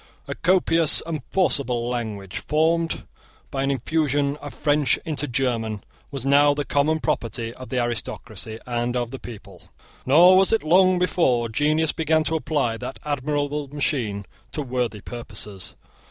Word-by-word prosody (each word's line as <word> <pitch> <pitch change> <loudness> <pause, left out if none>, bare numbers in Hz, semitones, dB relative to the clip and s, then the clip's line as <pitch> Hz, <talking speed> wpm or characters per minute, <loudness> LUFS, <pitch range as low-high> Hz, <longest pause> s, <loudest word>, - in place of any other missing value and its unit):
A - - -3
copious 165 -3 +3
and 160 -3 -4
forcible 130 -10 +2
language, 105 -6 -4
formed 165 +2 0 0.5
by 135 - -2
an 135 - 0
infusion 140 +1 0
of 145 -1 -8
French 145 -3 +1
into 150 -2 -2
German, 115 -5 -1 0.3
was 135 -3 -6
now 145 +1 +5
the 145 0 -2
common 155 +3 +1
property 115 -4 -2
of 130 +1 -11
the 130 - -2
aristocracy 110 -2 -4
and 120 0 -2
of 120 -1 -2
the 135 - -7
people. 100 -5 -12 0.4
Nor 175 +7 +7
was 190 0 +4
it 225 - +2
long 185 +3 +4
before 130 -10 +1
genius 150 +6 +1
began 160 0 +1
to 160 - -1
apply 145 -7 -1
that 125 +3 -6
admirable 145 0 -2
machine 125 -8 -2 0.3
to 150 - -2
worthy 125 -5 -2
purposes. 105 -5 -7
140 Hz, 150 wpm, -23 LUFS, 120-155 Hz, 0.5 s, Nor